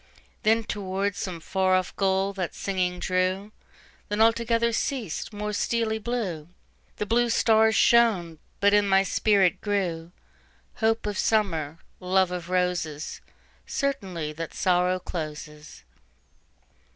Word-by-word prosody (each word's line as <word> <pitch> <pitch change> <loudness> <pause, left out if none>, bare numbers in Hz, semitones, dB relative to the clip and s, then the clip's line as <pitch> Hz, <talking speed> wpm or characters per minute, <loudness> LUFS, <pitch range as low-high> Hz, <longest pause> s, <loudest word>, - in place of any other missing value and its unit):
Then 225 +1 +3
toward 200 -1 -2
some 180 -4 -5
far 185 +3 +1
off 185 -1 -1
goal 195 0 +1
that 185 -3 -4
singing 185 -2 -1
drew; 185 +3 -1 0.6
Then 205 +1 -2
altogether 230 +1 +3
ceas'd; 235 - -3
more 210 0 -4
steely 220 +1 0
blueThe 205 -10 -3 0.6
blue 240 +2 +2
stars 220 -1 +4
shone; 195 -9 +3 0.2
but 200 0 +4
in 205 -1 +3
my 195 0 +5
spirit 195 -1 +2
grewHope 200 +4 -3
of 210 -1 -3
Summer, 165 -9 0 0.2
love 185 0 +2
of 180 -1 -5
Roses, 180 -4 -2 0.5
Certainty 190 - -3
that 165 +1 -7
Sorrow 180 0 +2
closes. 150 - -7
195 Hz, 115 wpm, -26 LUFS, 180-220 Hz, 0.6 s, my